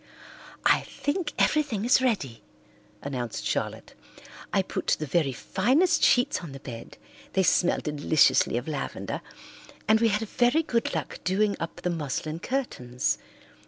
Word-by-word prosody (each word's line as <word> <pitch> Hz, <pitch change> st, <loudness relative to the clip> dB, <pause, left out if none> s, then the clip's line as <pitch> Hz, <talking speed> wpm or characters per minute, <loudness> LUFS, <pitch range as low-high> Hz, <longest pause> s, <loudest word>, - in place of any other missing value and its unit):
"I -, -, +5 dB
think 305 Hz, +1 st, -3 dB
everything 280 Hz, -9 st, +1 dB
is 250 Hz, +2 st, +5 dB
ready," 195 Hz, -, -1 dB, 0.6 s
announced 125 Hz, -4 st, -4 dB
Charlotte. -, -, -3 dB, 0.6 s
"I -, -, +2 dB
put -, -, -5 dB
the 155 Hz, -, -3 dB
very 150 Hz, -1 st, +1 dB
finest 265 Hz, -, +2 dB
sheets 245 Hz, 0 st, +4 dB
on 160 Hz, -6 st, -8 dB
the 135 Hz, -, -8 dB
bed, 115 Hz, -4 st, -9 dB, 0.4 s
they 190 Hz, -, +3 dB
smell 175 Hz, 0 st, +3 dB
deliciously 150 Hz, -4 st, +3 dB
of 120 Hz, -, -4 dB
lavender, 150 Hz, -3 st, -4 dB, 0.7 s
and 220 Hz, 0 st, +5 dB
we 230 Hz, -, +5 dB
had 215 Hz, +1 st, 0 dB
very 245 Hz, +9 st, +2 dB
good 235 Hz, -6 st, -1 dB
luck -, -, -4 dB
doing 200 Hz, +2 st, +1 dB
up 165 Hz, +1 st, -5 dB
the 180 Hz, -, -1 dB
muslin 155 Hz, 0 st, -3 dB
curtains. 125 Hz, -, -2 dB
180 Hz, 140 wpm, -27 LUFS, -, 0.7 s, I